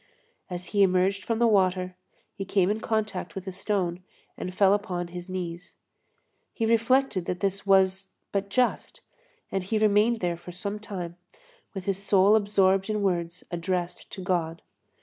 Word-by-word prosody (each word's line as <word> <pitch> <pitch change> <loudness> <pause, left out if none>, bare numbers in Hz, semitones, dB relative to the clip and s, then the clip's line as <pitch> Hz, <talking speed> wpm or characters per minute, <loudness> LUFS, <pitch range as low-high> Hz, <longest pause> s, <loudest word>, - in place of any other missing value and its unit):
As 180 0 -5
he 205 - +3
emerged 190 +1 +3
from 230 - -1
the 235 - +3
water, 185 -4 +2 0.4
he 195 - -5
came 195 0 +2
in 215 - -1
contact 220 -1 -2
with 195 -1 -6
a 190 - -4
stone 185 -2 -2 0.3
and 180 - -5
fell 195 +1 +4
upon 180 -4 -2
his 175 +1 -8
knees. 180 -1 -5 0.8
He 225 - 0
reflected 230 -3 +2
that 180 0 -3
this 195 0 -2
was 190 0 +3 0.2
but 200 0 -1
just, 250 +4 0 0.5
and 195 -1 -1
he 215 +4 -1
remained 215 +2 +3
there 175 -3 -1
for 175 +1 -10
some 200 +4 -4
time, 180 -5 -6 0.6
with 190 - -4
his 195 -1 -1
soul 200 +1 +5
absorbed 195 -2 +3
in 210 -1 0
words 175 -2 -1
addressed 175 0 -3
to 190 - -6
God. 170 -3 -1
190 Hz, 165 wpm, -27 LUFS, 180-205 Hz, 0.8 s, soul